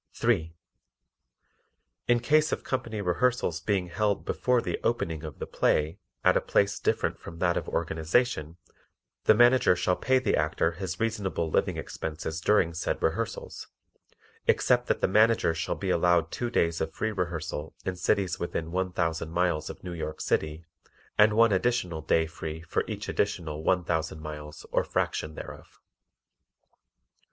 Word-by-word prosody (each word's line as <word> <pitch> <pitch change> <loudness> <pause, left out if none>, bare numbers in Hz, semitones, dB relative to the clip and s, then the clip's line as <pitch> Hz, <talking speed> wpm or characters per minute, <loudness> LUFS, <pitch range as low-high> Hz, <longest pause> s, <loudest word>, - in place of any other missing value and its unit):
3. 85 -9 +1 1.5
In 120 -1 +4
case 155 +5 +3
of - - -2
company 115 -5 -3
rehearsals 90 -2 +1
being 90 -1 0
held 105 +2 0
before 125 -1 +1
the - - -3
opening 85 -9 -1
of 75 -4 -7
the - - -4
play 80 +5 +1 0.2
at - - +5
a - - +3
place 100 0 +1
different - - 0
from 85 - -10
that 85 0 +1
of - - -3
organization, 80 +1 0 0.7
the 110 - +7
Manager 120 -3 +5
shall 90 +1 +1
pay 130 +6 +2
the 130 - +1
Actor 80 +2 +1
his 90 0 -5
reasonable 100 -7 -1
living - - +1
expenses 80 +1 -5
during 90 -3 +3
said 80 - -2
rehearsals, - - -2 0.8
except 125 -1 +3
that - - 0
the - - +3
Manager 110 -2 +4
shall 80 +1 -2
be 95 -2 -2
allowed 85 -1 +3
two 120 - -2
days 85 -7 +1
of 80 - -1
free 110 - -1
rehearsal 85 -5 -4
in 95 - -2
cities 90 0 0
within 85 -1 -3
one 95 +1 -1
thousand 80 -2 -1
miles 85 -2 0
of - - -9
New 90 -1 -5
York 80 -2 -5
City 80 +1 -1 0.5
and 105 +1 +5
one 115 0 +5
additional 95 -5 0
day 80 +1 +2
free 80 0 -6
for 85 - -1
each - - -5
additional 80 -2 -2
one 90 +1 +2
thousand 80 -2 -2
miles 75 -1 -8
or - - +2
fraction 75 0 -2
thereof. - - -10
85 Hz, 155 wpm, -28 LUFS, 80-105 Hz, 1.5 s, the